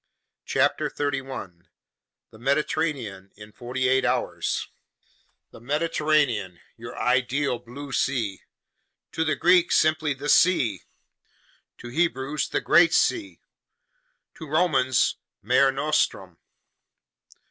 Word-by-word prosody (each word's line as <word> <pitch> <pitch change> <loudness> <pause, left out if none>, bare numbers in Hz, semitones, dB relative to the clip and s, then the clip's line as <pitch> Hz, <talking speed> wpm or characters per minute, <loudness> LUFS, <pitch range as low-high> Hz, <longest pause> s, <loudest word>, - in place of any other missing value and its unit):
CHAPTER - - +1
7 145 -2 -2 1.1
The 110 - -16
Mediterranean 135 -7 -2
in 105 +1 -13
Forty 125 +3 -3
Eight 130 0 +2
Hours 120 - -1 0.8
THE - - -14
MEDITERRANEAN, 145 - 0 0.2
your 115 +1 -10
ideal 125 +2 0
blue 130 +4 -10
sea: 120 -7 -1 0.7
to 160 -1 0
Greeks 175 0 +3
simply 155 -2 +1
"the 140 +2 -7
sea," 135 - +3 1.0
to 120 - -10
Hebrews 145 -1 -1
"the - - -1
great 170 0 +4
sea," 320 -4 0 0.9
to 160 - -10
Romans 145 -5 +2 0.3
mare 130 +5 +3
nostrum. 135 - -1
135 Hz, 95 wpm, -25 LUFS, 120-155 Hz, 1.1 s, great